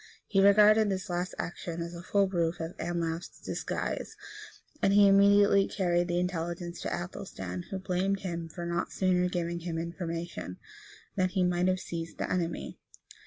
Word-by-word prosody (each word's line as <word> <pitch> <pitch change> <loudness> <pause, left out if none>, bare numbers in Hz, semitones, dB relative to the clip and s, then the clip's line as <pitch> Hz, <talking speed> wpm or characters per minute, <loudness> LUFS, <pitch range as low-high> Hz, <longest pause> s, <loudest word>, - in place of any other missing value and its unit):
He 195 - +2
regarded 210 +2 +6
this 190 0 -3
last 175 +1 -2
action 170 -1 -4
as 170 +1 -7
a 170 - -7
full 200 +2 +2
proof 170 -3 0
of 165 +1 -5
Anlaf's 170 -1 -3
disguise; - - -4 0.6
and 195 - +3
he 205 0 +7
immediately 200 0 +6
carried 175 -2 +1
the 175 -1 0
intelligence 175 -1 -3
to - - -3
Athelstan, 95 - -5
who 195 - -3
blamed 190 +1 -1
him 170 -3 -4
for 170 +1 -6
not 170 0 -2
sooner 180 -1 +2
giving 170 -1 -2
him 170 -1 -4
information, 170 - -4 0.6
that 185 -1 +2
he 190 -3 +2
might 180 0 +2
have 185 0 +2
seized 165 -2 -6
his - - -1
enemy. 175 -2 -2
175 Hz, 165 wpm, -30 LUFS, 170-190 Hz, 0.6 s, he